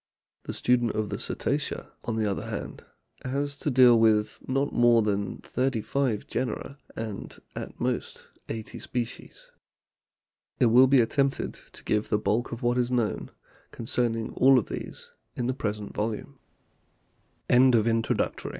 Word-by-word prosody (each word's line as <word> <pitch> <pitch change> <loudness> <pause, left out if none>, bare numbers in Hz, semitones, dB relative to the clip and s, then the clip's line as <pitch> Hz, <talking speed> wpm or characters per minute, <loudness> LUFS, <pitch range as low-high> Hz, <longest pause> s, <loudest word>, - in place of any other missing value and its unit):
The - - -4
student 120 -2 +2
of 110 -2 -2
the - - -4
Cetacea, - - -2
on 115 - -2
the 110 -1 0
other 100 -2 -2
hand, - - -5 0.4
has 140 +2 -2
to - - -1
deal 125 -3 +6
with 110 -1 +3
not 135 +2 0
more 120 -1 +5
than 100 -2 -1
thirty 125 -3 -1
five 130 -7 -1
genera 130 +2 -4 0.2
and 110 -3 -6 0.2
at - - -7
most - - -2 0.3
eighty 110 -1 -5
species. 120 -2 -6 1.1
It 120 -3 +4
will 125 +3 +7
be 135 -1 +6
attempted 135 +4 0 0.2
to - - -11
give 105 0 0
the 105 - +3
bulk 110 +4 0
of 120 +2 -6
what 120 +1 +2
is 120 0 +1
known 120 -4 -1 0.4
con 115 - -8
cerning 115 -1 0
all 135 0 +6
of 120 - 0
these - - -7 0.2
in 120 - -2
the 130 - 0
present 105 -4 -4
volume. 105 0 -4 1.1
A 120 - +5
120 Hz, 150 wpm, -27 LUFS, 110-130 Hz, 1.1 s, will